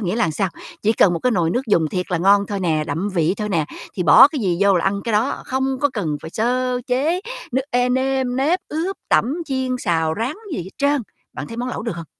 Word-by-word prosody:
nghĩa 195 +1 -1
là 170 -9 +1
sao, 190 +5 -1 0.3
chỉ 215 - +3
cần 195 -5 +4
một 170 - -1
cái 250 - +1
nồi 175 -6 +1
nước 245 - +1
dùng 170 -7 +2
thiệt 180 +3 -3
là 180 - +1
ngon 200 +3 +4
thôi 200 -2 -3
nè, 160 -4 0
đậm 165 +6 -2
vị 170 +1 +2
thôi 210 -1 -3
nè, 165 -6 +1 0.3
thì 185 - -1
bỏ 170 - +8
cái 295 -4 -4
gì 180 -4 0
vô 200 -2 +4
là 170 - 0
ăn 200 +1 0
cái 230 - -2
đó, 220 +6 0
không 265 0 -1
có 285 -1 +2
cần 165 - -2
phải 160 - -7
sơ 250 +3 0
chế 295 +8 +1 0.3
nước 265 +2 +1
ê 245 0 +2
nêm 260 0 0
nếp, 310 +7 +2
ướp, 340 +6 -2
tẩm, 255 +5 +2
chiên, 260 -2 -1
xào, 160 -6 0
rán 250 - -2 0.2
gì - - -2
hết 185 - -10
trơn. 285 -1 +2 0.3
Bạn - - -6
thấy 230 - -8
món 245 +1 -3
lẩu 250 - -4
được 225 -6 -4
hông? 165 -1 -7
220 Hz, 255 wpm, -20 LUFS, 180-260 Hz, 0.3 s, bỏ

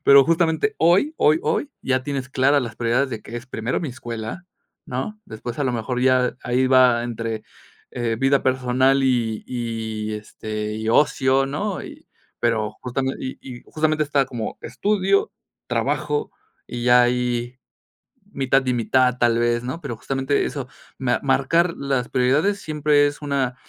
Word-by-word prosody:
pero 140 -1 +8
justamente 165 +5 +1
hoy, 180 - +3
hoy, 155 +1 +4
hoy 290 - -1
ya 130 0 0
tienes 135 -1 -4
claras 140 +2 +3
las 115 -2 -6
prioridades 120 +3 +1
de 110 - -5
que 120 - -7
es 120 +2 -8
primero 115 -1 -2
mi 160 - -3
escuela, 120 +5 -6 0.4
¿no? 175 +13 -4
Después 115 +4 -7
a - - +1
lo 130 - +1
mejor 125 +2 -2
ya 130 -1 +3
ahí 125 +1 +1
va 130 -2 +5
entre, 115 -2 -4 0.5
eh, 120 -2 -1
vida 135 +2 +3
personal 130 +1 +2
y 115 -4 0
y, 110 -3 -4
este, 105 0 -5
y 110 0 -4
ocio, 135 0 +3
¿no? 180 +8 -3
Y - - -12 0.3
pero 110 -3 0
justame 130 +1 -1
y 130 - -5
y 125 -2 -9
y - - -19
justamente 155 0 0
está 140 -2 +2
como 120 -4 -5
estudio, 195 - +1 0.4
trabajo, 440 0 -1 0.3
y 120 0 -5
ya 125 0 +6
ahí 120 0 -1 0.7
mitad 135 0 +1
y 125 - +1
mitad 125 +1 +2
tal 120 -1 +3
vez, 120 0 +1
¿no? 130 +6 -4
Pero, 135 -7 -5
justamente 135 +3 0
eso, 140 -4 -4 0.3
me 125 -2 +1
marcar 165 +6 +2
las 135 -3 -1
prioridades 145 +11 +2
siempre 150 -1 +2
es 145 +1 -6
una 140 -3 -1
130 Hz, 160 wpm, -22 LUFS, 120-140 Hz, 0.7 s, pero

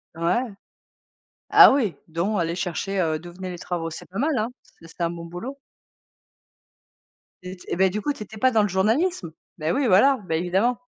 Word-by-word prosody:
Ouais. 170 +8 +1 1.1
Ah - - +9
oui, 230 -10 0
dont 175 +6 -1
aller 170 0 -1
chercher, 185 +2 -3
heu, 155 -2 0
d'où 175 +1 -11
venaient 185 0 -7
les 175 - -7
travaux. 165 -2 -3
C'est 160 - -9
pas 195 +4 -6
mal, 290 -1 +1
hein! 220 +3 0
C'est 165 - -19
c'est 165 - -12
un 170 - +1
bon 170 -1 -7
boulot. 235 +12 -7 1.8
T 180 0 -8
eh - - -2
ben, 190 +1 +3
du 210 +2 -3
coup, 290 - -1
tu 215 - -8
étais 215 +1 -12
pas 260 +4 +3
dans 220 -2 +3
le 205 - +1
journalisme? 215 - 0 0.3
Bah 155 +2 -1
oui, 280 - +1
voilà, 260 +8 +5
bah, 160 - 0
évidemment. 190 +9 +1
190 Hz, 200 wpm, -24 LUFS, 170-225 Hz, 1.8 s, Ah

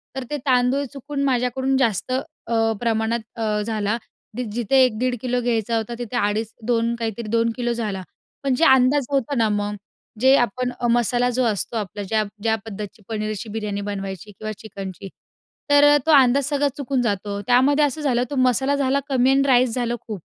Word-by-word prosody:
तर 265 - -3
ते 295 - -2
तांदूळ 255 +1 +2
चुकून 280 +1 -4
माझ्याकडून 260 0 +1
जास्त 235 -3 0
अ, 235 -5 -1
प्रमाणात 230 0 0 0.2
अ, 215 -2 -1
झाला. 210 0 -1 0.4
दी 250 - -2
जिथे 240 +3 +1
1-1.5 250 +1 +1
किलो 250 -1 0
घ्यायचा 230 -1 0
होता, 225 +1 -3
तिथे 240 0 -5
2.5-2 230 +2 -1
काहीतरी 230 -1 -4
2 230 +1 +2
किलो 240 0 -1
झाला. 210 -5 -3 0.4
पण 270 -2 +1
जे 325 - +3
अंदाज 265 +1 +5
होता 280 0 0
ना, 225 -2 +3
मग 205 0 -1 0.5
जे 265 +1 +6
आपण 250 +2 0
अ, 240 - 0
मसाला 240 +1 +2
जो 250 +1 0
असतो 225 +1 -1
आपला 205 -1 -4
ज्या 215 +2 0 0.2
ज्या 220 +1 +2
पद्धतीची 210 0 -8
पनीरची 215 0 -3
बिर्याणी 210 -1 -3
बनवायची 195 0 -6
किंवा 215 +2 -6
चिकनची 195 -2 -8 0.6
तर 290 0 +7
तो 320 - +3
अंदाज 270 -1 +5
सगळा 290 -1 +1
चुकून 275 -2 -1
जातो, 200 -2 -2
त्यामध्ये 265 +4 +4
असं 290 +2 -3
झालं 250 -4 +1
तो 285 - -4
मसाला 255 +2 +2
झाला 275 0 +1
कमी 260 -1 +3
आणि 275 - +4
राईस 250 -2 +4
झालं 240 -1 -1
खूप. 210 -5 -6
240 Hz, 175 wpm, -22 LUFS, 215-260 Hz, 0.6 s, तर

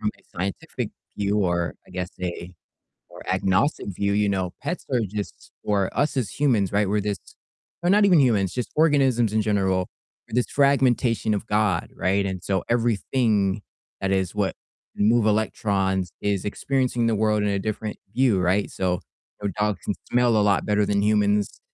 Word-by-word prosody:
From 105 - 0
a - - -24 0.2
scientific 95 +2 -3 0.3
view, 100 +1 0
or 85 -3 0
I - - -18
guess 90 -1 -4
a 90 0 -5 0.6
more - - -12
agnostic 95 +10 +1
view, 100 0 0
you 105 0 +2
know, 95 -3 -1
pets 175 - -4
are 125 - +2
just 105 +1 -7
for 100 -2 +1
us 145 0 +1
as 115 -9 -1
humans, 115 -10 +2
right, 100 -1 +2
we're 105 +1 +1
this 100 -1 -2 0.7
or 175 - +2
not 205 +2 +5
even 180 -5 +5
humans, 105 -9 +2
just 125 -2 -3
organisms 135 -8 +3
in 110 - +2
general, 95 -3 +1 0.4
we're - - -15
this 125 - +1
fragmentation 130 -5 +2
of 105 +2 -2
God, 105 -5 +1
right, 100 +2 +1
and 95 -2 -3
so 95 -2 -1
everything 110 -3 +1 0.4
that 95 - 0
is 95 -2 0
what 100 -2 0 0.4
can 105 - +2
move 115 0 +4
electrons 95 -4 0
is 100 -2 0
experiencing 125 +1 0
the 115 - +2
world 105 0 +1
in 105 - +1
a 100 -1 0
different 110 +1 -4 0.2
view, 125 -7 +3
right, 95 +3 +1
so, 90 -1 -1 0.4
you 105 - -1
know, - - -5
dogs 105 -1 +1
can - - 0 0.2
smell 120 -1 +3
a 105 - +4
lot 105 -1 +2
better 105 0 +2
than 100 0 +1
humans. 105 -1 +1
105 Hz, 180 wpm, -24 LUFS, 95-115 Hz, 0.7 s, not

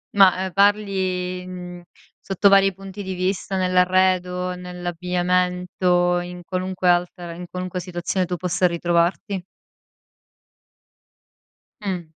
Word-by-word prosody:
Ma, 195 -2 +7
uhm, 190 - -5
parli, 200 0 +3 0.5
mhmm, 180 -1 -8 0.4
sotto 195 +1 +3
vari 195 -1 +5
punti 195 +1 -9
di 190 0 -4
vista, 185 +1 -2
nell'arredo, 180 0 +2
nell'abbigliamento, 180 0 0
in 180 0 -8
qualunque 185 0 -1
altra 175 0 0
in 175 +1 -8
qualunque 185 0 -4
situazione 180 +1 -2
tu 180 0 -3
possa 180 +1 0
ritrovarti? 175 +3 0 2.4
Mh. 185 -4 -3
180 Hz, 105 wpm, -22 LUFS, 180-190 Hz, 2.4 s, Ma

